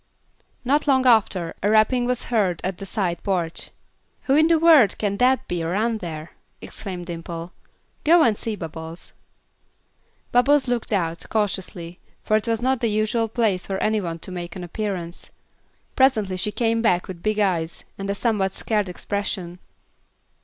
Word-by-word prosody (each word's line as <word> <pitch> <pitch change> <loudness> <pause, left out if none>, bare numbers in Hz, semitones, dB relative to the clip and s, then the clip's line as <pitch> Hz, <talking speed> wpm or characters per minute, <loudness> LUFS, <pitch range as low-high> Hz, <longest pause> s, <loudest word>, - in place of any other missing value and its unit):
Not 290 +4 +2
long 260 -2 +3
after, 195 -8 +3
a 205 - +1
rapping 220 +3 +3
was 250 0 -2
heard 190 -7 +2
at 185 -1 -3
the 195 - -6
side 180 -5 -2
porch. 175 -5 -2 0.5
"Who 270 - +2
in 310 +2 +5
the 335 -1 +4
world 315 -9 +6
can 200 -2 -1
that 255 +2 +2
be 175 -1 -2
around 215 +7 0
there!" 160 -3 -7 0.3
exclaimed 180 -4 -7
Dimple. 170 0 -7 0.5
"Go 335 +1 +6
and 225 -6 +3
see, 220 +1 -4
Bubbles." 165 -1 -8 1.2
Bubbles 270 +3 +4
looked 240 -2 -1
out, 170 -5 -1
cautiously, 185 -5 -2 0.2
for 215 - +2
it 215 +2 0
was 230 0 0
not 260 0 +2
the 230 - +1
usual 215 +2 +1
place 215 -5 0
for 195 - -2
any 215 +1 +1
one 165 -3 -4
to 175 - -8
make 175 -2 -6
an 185 - -6
appearance. 175 -2 -5 0.7
Presently 220 -8 +3
she 190 +3 -1
came 230 0 0
back 180 -6 +2
with 180 -2 -8
big 215 +2 0
eyes 175 -6 0
and 195 0 -5
a 200 - 0
somewhat 200 -4 0
scared 210 -3 -1
expression. 180 -2 -4
205 Hz, 165 wpm, -23 LUFS, 175-230 Hz, 1.2 s, world